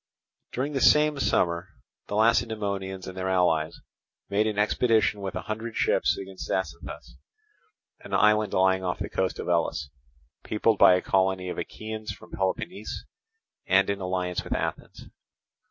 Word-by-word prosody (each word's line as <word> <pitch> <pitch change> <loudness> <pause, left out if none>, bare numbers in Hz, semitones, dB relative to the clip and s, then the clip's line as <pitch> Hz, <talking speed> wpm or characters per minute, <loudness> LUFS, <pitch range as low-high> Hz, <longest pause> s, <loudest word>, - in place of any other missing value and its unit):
During 140 +4 -2
the 135 - -1
same 150 -1 +5
summer 85 -7 +1 0.4
the 105 - -4
Lacedaemonians 105 -4 0
and 95 - -8
their 95 0 -2
allies 85 -4 +1 0.5
made 105 +2 +2
an 105 -2 -2
expedition 105 0 +2
with 95 -1 -4
a - - -4
hundred 110 +1 -5
ships - - +2
against 95 -1 -8
Zacynthus, 95 - -4 0.8
an - - -12
island 105 -1 +4
lying 95 0 +3
off 90 -1 -1
the - - -4
coast 95 -1 -1
of - - -5
Elis, 80 -4 0 0.5
peopled 105 0 +1
by 90 - +8
a 90 - -1
colony 95 -1 +1
of - - -4
Achaeans 110 0 -6
from 100 - -13
Peloponnese, 95 - -3 0.6
and 95 +1 +4
in 100 -1 -4
alliance 90 -1 -2
with - - -3
Athens. - - -4
95 Hz, 150 wpm, -26 LUFS, 95-110 Hz, 0.8 s, by